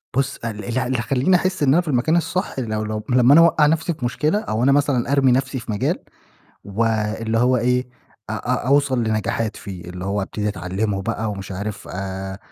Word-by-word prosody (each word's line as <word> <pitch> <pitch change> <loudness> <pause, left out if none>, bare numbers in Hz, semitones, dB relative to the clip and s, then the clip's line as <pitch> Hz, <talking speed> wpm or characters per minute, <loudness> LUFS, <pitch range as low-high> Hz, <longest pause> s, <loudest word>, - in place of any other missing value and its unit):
بُصّ، 135 +1 0
ال 110 -2 -5
ال 120 0 -3
اللي 130 0 -1
هيخلّيني 130 +9 +2
أحسّ 185 -2 0
إن 135 -1 +4
أنا 175 - +4
في 175 - -13
المكان 145 +3 +2
الصح 180 -3 -2
لو 110 -3 -2
لو 110 0 -4
لما 125 +1 +5
أنا 165 - +8
أوقّع 165 -2 +5
نَفْسي 160 +3 +1
في 140 -5 -5
مشكلة، 150 +10 0
أو 115 - -2
أنا 135 - +5
مثلًا 135 -3 +1
أرمي 135 -2 +4
نَفْسي 130 +1 0
في 115 - -6
مجال، 105 - 0 0.7
واللي 110 +1 -1
هو 125 +2 +3
إيه، 125 +1 +1 0.4
أ - - -1
أ 120 +3 -2
أوصل 140 -2 +3
لنجاحات 110 0 -1
فيه، 95 -4 -8
اللي 90 +1 -7
هو 100 +1 -1
أبتدي 105 +2 -3
أتعلّمه 95 +2 -2
بقى 110 +1 -2
ومش 100 -1 -6
عارف 100 +2 -5
آآ 95 +1 -5
120 Hz, 200 wpm, -21 LUFS, 105-135 Hz, 0.7 s, أنا